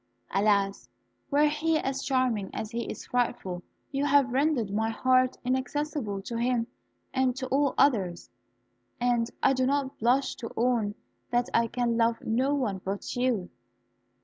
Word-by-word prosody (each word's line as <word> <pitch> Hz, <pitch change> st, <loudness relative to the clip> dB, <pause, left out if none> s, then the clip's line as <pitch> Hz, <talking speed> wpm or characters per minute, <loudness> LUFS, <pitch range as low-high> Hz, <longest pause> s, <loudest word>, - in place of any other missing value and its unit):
Alas! 195 Hz, -, +1 dB, 0.4 s
were 295 Hz, +2 st, +4 dB
he 310 Hz, +2 st, +1 dB
as 270 Hz, -2 st, -2 dB
charming 255 Hz, -8 st, 0 dB
as 220 Hz, -, -4 dB
he 235 Hz, 0 st, -3 dB
is -, -, -6 dB
frightful, 195 Hz, -7 st, -1 dB, 0.3 s
you 275 Hz, 0 st, -1 dB
have 280 Hz, -3 st, +3 dB
rendered 265 Hz, -6 st, +1 dB
my 220 Hz, +2 st, +1 dB
heart 255 Hz, +2 st, +2 dB
inaccessible 260 Hz, -5 st, -2 dB
to 230 Hz, +3 st, -4 dB
him 240 Hz, -1 st, +1 dB, 0.5 s
and 260 Hz, -2 st, +2 dB
to 260 Hz, -, -4 dB
all 280 Hz, 0 st, +2 dB
others; 190 Hz, -11 st, +2 dB, 0.7 s
and 240 Hz, -1 st, +1 dB
I 270 Hz, -, +5 dB
do 255 Hz, -1 st, +1 dB
not 275 Hz, -1 st, -1 dB
blush 250 Hz, +4 st, +2 dB
to 230 Hz, -, -6 dB
own 230 Hz, -4 st, +1 dB, 0.3 s
that 240 Hz, 0 st, +1 dB
I 230 Hz, 0 st, +3 dB
can 240 Hz, 0 st, 0 dB
love 230 Hz, 0 st, +2 dB
no 255 Hz, +5 st, +1 dB
one 205 Hz, -9 st, -1 dB
but 195 Hz, +1 st, -4 dB
you." 245 Hz, -7 st, 0 dB
245 Hz, 150 wpm, -28 LUFS, 220-270 Hz, 0.7 s, I